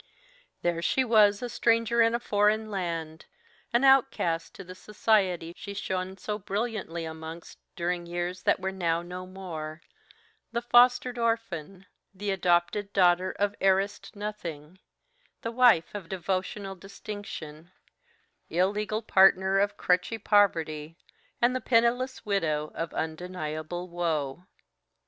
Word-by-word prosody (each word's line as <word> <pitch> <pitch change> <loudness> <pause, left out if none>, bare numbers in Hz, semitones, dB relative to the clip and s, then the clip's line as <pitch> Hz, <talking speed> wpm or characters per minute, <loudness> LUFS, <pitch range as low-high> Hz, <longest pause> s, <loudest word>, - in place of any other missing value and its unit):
There 170 -1 0
she 260 +9 +2
was, 215 -3 +4
a - - -1
stranger 230 0 +2
in 230 +1 +4
a - - 0
foreign 215 0 +1
land 165 -4 -4 0.4
an 240 +2 +2
outcast 265 -11 +3
to 195 - -8
the 185 0 -10
society 190 -4 0
she 200 -1 -8
shone 190 -1 -3
so 210 +2 -4
brilliantly 200 -5 -3
amongst 160 +1 -8 0.2
during 175 0 -2
years 175 +1 -3
that - - +2
were 190 0 -2
now 170 -3 -1
no 180 +1 -7
more, 165 -4 -7 0.7
the 235 0 -1
fostered 245 +1 +4
orphan, 195 -6 -2 0.3
the 200 +1 -2
adopted 185 +2 +1
daughter 180 -1 +3
of 205 0 +1
heiressed 195 +2 +1
nothing, 185 -5 -6 0.6
the 230 - -2
wife 235 -9 +4
of 195 -5 -7
devotional 190 +2 -3
distinction, 185 -5 -9 0.8
the 165 - -5
illegal 210 +4 0
partner 190 -1 +5
of 205 +1 0
crutchy 180 +5 +1
poverty, 165 -7 +1 0.5
and 250 +1 +4
the 255 - -1
penniless 245 +2 +1
widow 155 -7 0
of 165 0 -4
undeniable 160 +1 -4
woe. 170 -2 -2
190 Hz, 125 wpm, -28 LUFS, 170-210 Hz, 0.8 s, partner